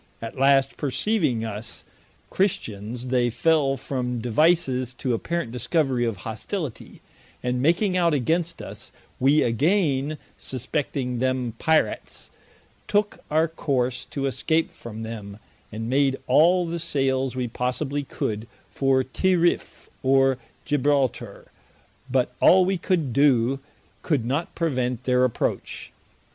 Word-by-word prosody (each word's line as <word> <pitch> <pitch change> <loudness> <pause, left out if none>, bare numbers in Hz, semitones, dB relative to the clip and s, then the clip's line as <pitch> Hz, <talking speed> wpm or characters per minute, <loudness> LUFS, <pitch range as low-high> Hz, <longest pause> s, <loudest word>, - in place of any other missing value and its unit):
At 115 0 -7
last 135 0 +3
perceiving 140 - 0
us 110 +1 -5 0.5
Christians, 120 - -2
they 125 -1 +2
fell 140 +1 +2
from 125 -3 -3
devices 130 0 +2
to 125 -1 -1
apparent 165 +2 -2
discovery 125 0 0
of 115 -2 -1
hostility, 125 - -5 0.4
and 125 0 0
making 180 +6 +2
out 170 -2 +3
against 160 +5 0
us: - - -9 0.3
we 140 +4 +4
againe 145 - +1 0.2
suspecting 130 -1 -3
them 130 -2 0
Pirats, 160 0 0 0.6
tooke 205 0 +1
our 160 +2 +3
course 130 -6 -1
to 140 -1 -4
escape 160 +4 0
from 115 -1 -8
them, 105 -3 -7 0.3
and 110 +1 -5
made 135 +1 +2
all 175 +3 +4
the 170 0 -3
sailes 135 -5 0
we 125 -1 -1
possibly 125 +4 -2
could 110 -5 -4 0.2
for 135 -1 +2
Tirriff, 175 +6 0
or 135 -1 +3 0.3
Gibraltar: 145 -3 0 0.6
but 125 -1 +1
all 185 0 +6
we 190 -1 0
could 160 -9 0
doe, 135 -1 +3 0.4
could 145 -9 0
not 140 +7 -2
prevent 125 -7 -1
their 125 0 +3
approach. 125 -3 -2
135 Hz, 120 wpm, -24 LUFS, 125-160 Hz, 0.6 s, all